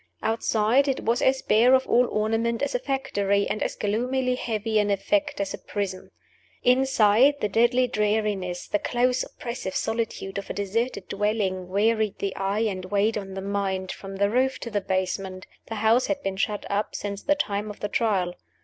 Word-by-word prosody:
Outside, 225 Hz, +4 st, +2 dB
it 270 Hz, -, 0 dB
was 230 Hz, +2 st, +1 dB
as 265 Hz, 0 st, +2 dB
bare 235 Hz, +5 st, +5 dB
of 260 Hz, -, +1 dB
all 245 Hz, +1 st, +3 dB
ornament 225 Hz, +3 st, 0 dB
as 280 Hz, -, -1 dB
a 245 Hz, -, +1 dB
factory, 200 Hz, -7 st, 0 dB
and 215 Hz, -, -3 dB
as -, -, -1 dB
gloomily 250 Hz, +5 st, 0 dB
heavy 220 Hz, -3 st, -1 dB
in 205 Hz, 0 st, +1 dB
effect 295 Hz, +9 st, 0 dB
as 200 Hz, -1 st, -2 dB
a -, -, -6 dB
prison. 190 Hz, -3 st, -4 dB, 0.5 s
Inside, 255 Hz, 0 st, +4 dB
the 210 Hz, -, 0 dB
deadly 240 Hz, +5 st, +3 dB
dreariness, 210 Hz, -5 st, -1 dB
the 205 Hz, -, 0 dB
close, 250 Hz, +3 st, +1 dB
oppressive 235 Hz, -6 st, -6 dB
solitude 220 Hz, -3 st, -2 dB
of 200 Hz, -, -9 dB
a -, -, -2 dB
deserted 205 Hz, +1 st, -2 dB
dwelling 195 Hz, -3 st, -1 dB
wearied 215 Hz, +2 st, +1 dB
the 200 Hz, -1 st, -3 dB
eye 195 Hz, +2 st, -1 dB
and 185 Hz, -3 st, -3 dB
weighed 205 Hz, +3 st, +1 dB
on 195 Hz, -2 st, -5 dB
the 195 Hz, -, -4 dB
mind, 195 Hz, -1 st, -2 dB
from 195 Hz, 0 st, -8 dB
the 200 Hz, +1 st, +1 dB
roof 260 Hz, +3 st, +2 dB
to 235 Hz, -, -5 dB
the 205 Hz, -1 st, 0 dB
basement. 190 Hz, 0 st, -2 dB, 0.2 s
The 225 Hz, -, -5 dB
house 220 Hz, +4 st, +3 dB
had 285 Hz, -1 st, -2 dB
been 195 Hz, 0 st, -2 dB
shut 205 Hz, +1 st, -1 dB
up 205 Hz, +1 st, -2 dB
since 200 Hz, -1 st, -4 dB
the 295 Hz, -, +2 dB
time 210 Hz, -6 st, -2 dB
of 210 Hz, -, -9 dB
the 205 Hz, -, -2 dB
Trial. 200 Hz, -6 st, 0 dB
215 Hz, 185 wpm, -25 LUFS, 200-240 Hz, 0.5 s, bare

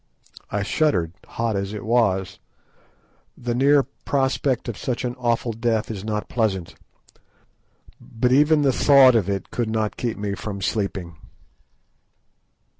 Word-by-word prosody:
I 100 Hz, 0 st, -1 dB
shuddered, 95 Hz, -, 0 dB
hot 115 Hz, -2 st, -2 dB
as 100 Hz, +1 st, -3 dB
it 105 Hz, -, -7 dB
was. 95 Hz, -6 st, +1 dB, 1.0 s
The 120 Hz, -1 st, -3 dB
near 140 Hz, +3 st, +4 dB
prospect 135 Hz, -1 st, -1 dB
of 120 Hz, -, -3 dB
such 125 Hz, +3 st, -3 dB
an 120 Hz, -, -2 dB
awful 120 Hz, -1 st, 0 dB
death 115 Hz, -1 st, -1 dB
is 100 Hz, -3 st, -6 dB
not 105 Hz, -1 st, -3 dB
pleasant, 100 Hz, -7 st, -1 dB, 1.3 s
but 120 Hz, +2 st, -1 dB
even 150 Hz, +3 st, +4 dB
the 135 Hz, -2 st, +3 dB
thought 135 Hz, -2 st, +6 dB
of 105 Hz, -5 st, +1 dB
it 100 Hz, -2 st, -3 dB
could 120 Hz, -2 st, -2 dB
not 110 Hz, -1 st, -1 dB
keep 120 Hz, -2 st, -3 dB
me 100 Hz, -1 st, -3 dB
from 100 Hz, 0 st, -5 dB
sleeping. 95 Hz, -4 st, -3 dB
115 Hz, 135 wpm, -23 LUFS, 100-125 Hz, 1.3 s, thought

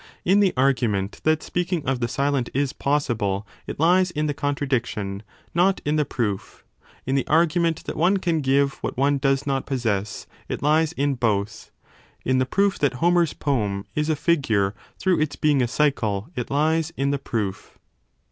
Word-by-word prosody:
In 195 Hz, +3 st, +4 dB
the 200 Hz, -3 st, +4 dB
argument 115 Hz, -7 st, +1 dB
that 155 Hz, 0 st, +2 dB
speaking 175 Hz, -2 st, -2 dB
of 130 Hz, -1 st, 0 dB
the 120 Hz, -, 0 dB
silent 140 Hz, +1 st, 0 dB
is 140 Hz, -1 st, 0 dB
possible 115 Hz, -9 st, -1 dB, 0.2 s
it -, -, -6 dB
lies 180 Hz, +3 st, +4 dB
in 155 Hz, -3 st, -2 dB
the 150 Hz, -, 0 dB
contradiction, 125 Hz, -9 st, -2 dB, 0.3 s
not 185 Hz, +3 st, +3 dB
in 150 Hz, +1 st, +1 dB
the 150 Hz, -1 st, +2 dB
proof; 105 Hz, -8 st, -3 dB, 0.4 s
in 130 Hz, -, -1 dB
the 135 Hz, -2 st, 0 dB
argument 165 Hz, +1 st, +2 dB
that -, -, -5 dB
one 180 Hz, +5 st, +3 dB
can 170 Hz, -4 st, 0 dB
give 140 Hz, 0 st, +1 dB
what -, -, -4 dB
one 140 Hz, +1 st, +2 dB
does 135 Hz, 0 st, +1 dB
10 140 Hz, -, -1 dB
not 135 Hz, -, -2 dB
possess, 110 Hz, -7 st, -2 dB, 0.2 s
it -, -, -4 dB
lies 155 Hz, +2 st, +3 dB
in 145 Hz, -3 st, 0 dB
both; 105 Hz, -5 st, -1 dB, 0.6 s
in 130 Hz, 0 st, +2 dB
the 130 Hz, -, +1 dB
proof 200 Hz, +6 st, +1 dB
that 145 Hz, -3 st, +2 dB
Homer 175 Hz, +6 st, +3 dB
s 165 Hz, -, 0 dB
poem 105 Hz, -8 st, -1 dB
is 150 Hz, +1 st, -1 dB
a 155 Hz, -, +2 dB
figure 115 Hz, -, +1 dB, 0.2 s
through 185 Hz, -4 st, +1 dB
its 155 Hz, -2 st, -1 dB
being 145 Hz, -3 st, +2 dB
a 120 Hz, -, +2 dB
cycle 115 Hz, -6 st, 0 dB
it 125 Hz, -3 st, -4 dB
lies 160 Hz, +3 st, +1 dB
in 140 Hz, +1 st, +1 dB
the 140 Hz, -, -1 dB
proof. 105 Hz, -7 st, -4 dB
140 Hz, 185 wpm, -23 LUFS, 120-155 Hz, 0.6 s, In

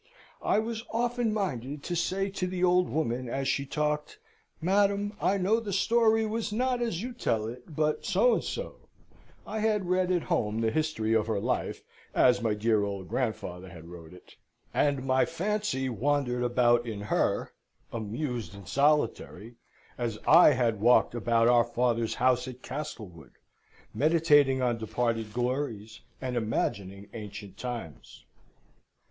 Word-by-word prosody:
I -, -, +2 dB
was 225 Hz, +1 st, -2 dB
often 240 Hz, 0 st, 0 dB
minded 145 Hz, -, -3 dB
to 175 Hz, -, -3 dB
say 190 Hz, +3 st, -1 dB
to 190 Hz, -1 st, -2 dB
the 180 Hz, 0 st, -3 dB
old 180 Hz, 0 st, +3 dB
woman 125 Hz, -5 st, -2 dB
as 135 Hz, +2 st, -2 dB
she 140 Hz, +1 st, 0 dB
talked, 150 Hz, -, -2 dB, 0.4 s
"Madam, 200 Hz, +3 st, +1 dB
I 200 Hz, -, +2 dB
know 200 Hz, +4 st, +2 dB
the 215 Hz, -3 st, -5 dB
story 225 Hz, +3 st, +3 dB
was 220 Hz, 0 st, -2 dB
not 250 Hz, +2 st, 0 dB
as 225 Hz, -6 st, -2 dB
you 250 Hz, +1 st, -5 dB
tell 115 Hz, -, -1 dB
it, 125 Hz, +7 st, -9 dB
but 155 Hz, 0 st, 0 dB
so -, -, +3 dB
and -, -, 0 dB
so" -, -, -5 dB, 0.7 s
(I 220 Hz, -, -4 dB
had 210 Hz, -3 st, +1 dB
read 185 Hz, 0 st, +2 dB
at 175 Hz, -2 st, +1 dB
home 110 Hz, 0 st, -1 dB
the 110 Hz, -1 st, +1 dB
history 155 Hz, -8 st, 0 dB
of 110 Hz, -1 st, +2 dB
her 110 Hz, -3 st, 0 dB
life, -, -, -2 dB, 0.3 s
as 125 Hz, -1 st, +4 dB
my 110 Hz, -2 st, 0 dB
dear 110 Hz, 0 st, +2 dB
old 100 Hz, -2 st, -4 dB
grandfather 95 Hz, -7 st, -3 dB
had 85 Hz, -1 st, -12 dB
wrote 85 Hz, -2 st, -11 dB
it): 90 Hz, -, -16 dB, 0.4 s
and 140 Hz, -3 st, +1 dB
my 130 Hz, 0 st, +3 dB
fancy 195 Hz, -4 st, -1 dB
wandered 125 Hz, +1 st, 0 dB
about 120 Hz, -1 st, +3 dB
in 105 Hz, -3 st, -5 dB
her, 105 Hz, -, 0 dB, 0.4 s
amused 115 Hz, -, -4 dB
and 100 Hz, -3 st, -12 dB
solitary, 140 Hz, -6 st, 0 dB, 0.4 s
as 115 Hz, -3 st, -2 dB
I 160 Hz, -1 st, +8 dB
had 115 Hz, -5 st, 0 dB
walked 120 Hz, +1 st, +4 dB
about 115 Hz, -1 st, +2 dB
our 120 Hz, -1 st, +5 dB
father's 120 Hz, -1 st, 0 dB
house 125 Hz, 0 st, +2 dB
at 125 Hz, 0 st, -9 dB
Castlewood, 105 Hz, -, -7 dB, 0.6 s
meditating 145 Hz, -1 st, +4 dB
on 120 Hz, -2 st, 0 dB
departed 115 Hz, 0 st, -2 dB
glories, 120 Hz, -3 st, -3 dB, 0.2 s
and 130 Hz, -1 st, -4 dB
imagining 100 Hz, -3 st, -2 dB
ancient 100 Hz, -3 st, -8 dB
times. 115 Hz, -, -7 dB
130 Hz, 155 wpm, -28 LUFS, 115-180 Hz, 0.7 s, I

